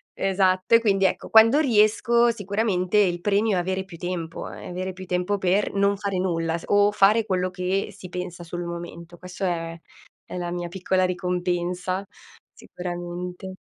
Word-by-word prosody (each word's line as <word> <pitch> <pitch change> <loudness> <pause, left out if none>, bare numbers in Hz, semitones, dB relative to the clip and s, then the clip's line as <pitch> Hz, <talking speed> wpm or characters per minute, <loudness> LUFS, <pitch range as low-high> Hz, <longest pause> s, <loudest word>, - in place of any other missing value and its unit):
esatto. 190 +1 +2
E 230 - +5
quindi 195 -3 +2
ecco, - - -1
quando 225 +6 +7
riesco 235 -1 +3
sicuramente 205 -2 -1
il 175 -4 +2
premio 205 +1 +2
è - - +1
avere 190 +1 -2
più 180 -3 -11
tempo, 170 -2 -5
è - - -9
avere 185 +1 -4
più 185 +1 -10
tempo 180 +3 -1
per 190 +2 +1
non 200 0 +2
fare 200 -2 -2
nulla 165 -2 -1
s - - -11
o 205 0 +4
fare 210 +2 +4
quello 185 -3 -1
che 185 +2 -1
si 180 -2 -10
pensa 180 -1 -6
sul 175 +1 -5
momento. 170 0 -8
Questa 180 +2 -6
è, 165 -1 -3 0.5
è - - -8
la 175 -1 -3
mia 175 0 -3
piccola 185 +1 0
ricompensa 180 +1 -2 0.5
sicuramente. 180 +1 -7
185 Hz, 165 wpm, -24 LUFS, 175-200 Hz, 0.5 s, quando